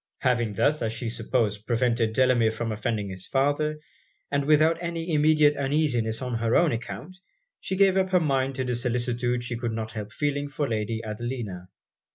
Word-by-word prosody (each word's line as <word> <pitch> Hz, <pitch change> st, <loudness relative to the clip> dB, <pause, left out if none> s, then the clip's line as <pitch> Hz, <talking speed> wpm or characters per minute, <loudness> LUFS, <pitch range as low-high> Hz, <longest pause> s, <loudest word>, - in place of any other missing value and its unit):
Having 120 Hz, -4 st, +1 dB
thus, 150 Hz, +9 st, +2 dB
as 110 Hz, -1 st, -1 dB
she 115 Hz, 0 st, -3 dB
supposed, 110 Hz, -3 st, -1 dB
prevented 115 Hz, -2 st, +1 dB
Delamere 125 Hz, -2 st, +3 dB
from 115 Hz, +1 st, -3 dB
offending 105 Hz, -1 st, -2 dB
his 95 Hz, 0 st, -8 dB
father, 145 Hz, +3 st, +1 dB, 0.5 s
and 140 Hz, 0 st, +1 dB
without 155 Hz, +2 st, +4 dB
any 170 Hz, -1 st, -3 dB
immediate 150 Hz, -1 st, +4 dB
uneasiness 135 Hz, -5 st, 0 dB
on 125 Hz, -1 st, -3 dB
her 115 Hz, 0 st, +1 dB
own 170 Hz, -3 st, +4 dB
account, 115 Hz, -, -6 dB, 0.4 s
she 190 Hz, -, -3 dB
gave 195 Hz, -1 st, +4 dB
up 190 Hz, -1 st, +2 dB
her 185 Hz, -1 st, +4 dB
mind 135 Hz, -4 st, 0 dB
to 130 Hz, -, -1 dB
the 125 Hz, -1 st, -1 dB
solicitude 120 Hz, 0 st, -1 dB
she 120 Hz, 0 st, -3 dB
could 120 Hz, -1 st, -3 dB
not 110 Hz, 0 st, -4 dB
help 105 Hz, -1 st, -6 dB
feeling 145 Hz, +1 st, -1 dB
for 145 Hz, 0 st, -2 dB
Lady 110 Hz, 0 st, -2 dB
Adelina. 110 Hz, -5 st, -5 dB
125 Hz, 180 wpm, -26 LUFS, 115-145 Hz, 0.5 s, without